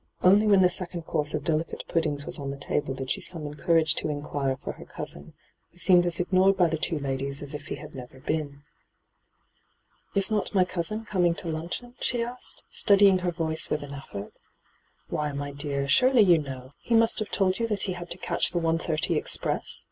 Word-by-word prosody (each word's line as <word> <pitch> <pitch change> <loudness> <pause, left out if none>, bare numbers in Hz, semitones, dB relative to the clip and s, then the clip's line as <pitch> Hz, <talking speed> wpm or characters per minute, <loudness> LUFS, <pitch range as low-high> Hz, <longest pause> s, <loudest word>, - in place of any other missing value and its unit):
Only 200 +4 +6
when 200 -2 +6
the 180 - +6
second 175 -1 -5
course 150 -1 -1
of 150 - -3
delicate 160 +1 -1
puddings 150 -4 0
was - - -4
on 140 -1 -4
the 140 - -5
table 140 -1 -1
did 135 0 -4
she - - -1
summon 155 -4 -5
courage 160 +1 +3
to - - -1
inquire 145 -2 -2
for - - -6
her - - -11
cousin, 70 - -8 0.4
who - - -22
seemed 175 0 +5
aa - - +1
ignored 185 +2 +3
by 175 -2 +4
the 160 - -1
two 160 - 0
ladies 140 0 -3
as 145 +1 -8
if 145 0 -7
he - - -3
had 150 0 -10
never 130 0 -10
been. 145 0 -3 0.7
* - - -39
Is 195 +1 +1
not 210 -1 -1
my 185 -1 +5
cousin 185 +5 -3
coming 180 -5 +2
to 170 - -2
luncheon 170 +10 -4
?' - - -32
she 240 -2 +1
asked, 245 +2 -8
steadying 200 -2 +5
her 180 -1 -1
voice 160 -2 -2
with 150 - -1
an 140 0 -8
effort. 105 -7 -8 0.4
' - - -40
Why, 150 -1 -1
my 145 0 -4
dear, 140 -1 -2
surely 255 - +5
you 175 -4 +5
know: 130 -3 -7
he 235 - +1
must 225 0 +4
have 215 - -3
told 190 0 +1
you 230 - +1
that 210 -3 0
he 185 - -1
had 175 -1 -8
to - - -4
catch - - +1
the 175 - -1
1.30 165 -1 0
express - - -2
165 Hz, 215 wpm, -27 LUFS, 145-185 Hz, 0.7 s, Only